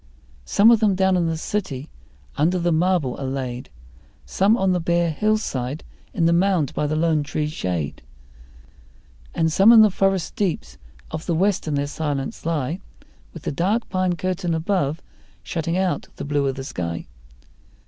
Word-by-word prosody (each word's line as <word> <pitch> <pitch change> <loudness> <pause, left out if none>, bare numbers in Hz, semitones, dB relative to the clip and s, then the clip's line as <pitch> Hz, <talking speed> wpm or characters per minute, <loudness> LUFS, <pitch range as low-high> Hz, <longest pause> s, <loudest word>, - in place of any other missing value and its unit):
Some 215 - +5
of 230 - +5
them 210 -3 +3
down 190 0 +3
in 175 -2 +1
the 165 -1 -1
city 155 -7 -3 0.5
under 165 +5 +2
the 175 0 +1
marble 165 -5 +1
are - - -3
laid, 130 - -4 0.6
Some 205 +4 +2
on 190 -3 +2
the 180 - +1
bare 170 0 +1
hillside 155 - -1 0.3
in 170 - 0
the 170 - +4
mound 175 -5 +2
by 150 - -1
the 155 - -1
lone 160 -1 +2
tree 150 +1 -2
shade, 90 - -3 1.3
And 160 -1 +1
some 200 +6 +7
in 225 -2 +9
the 215 - +4
forest 195 -2 0
deeps 200 -8 -2 0.3
of 160 0 -6
the 170 - +1
west 195 0 +1
in 150 - 0
their 140 0 0
silence 145 0 -4
lie, 160 +1 -1 0.5
With 165 - -11
the - - -2
dark 195 +10 0
pine 185 -2 0
curtain 180 0 -2
above 160 -3 -1 0.4
shutting 165 +1 -2
out 190 -1 -1
the 140 - -6
blue 145 -1 0
of 135 - -1
the 135 - -6
sky. 85 -9 -4
165 Hz, 170 wpm, -22 LUFS, 145-190 Hz, 1.3 s, in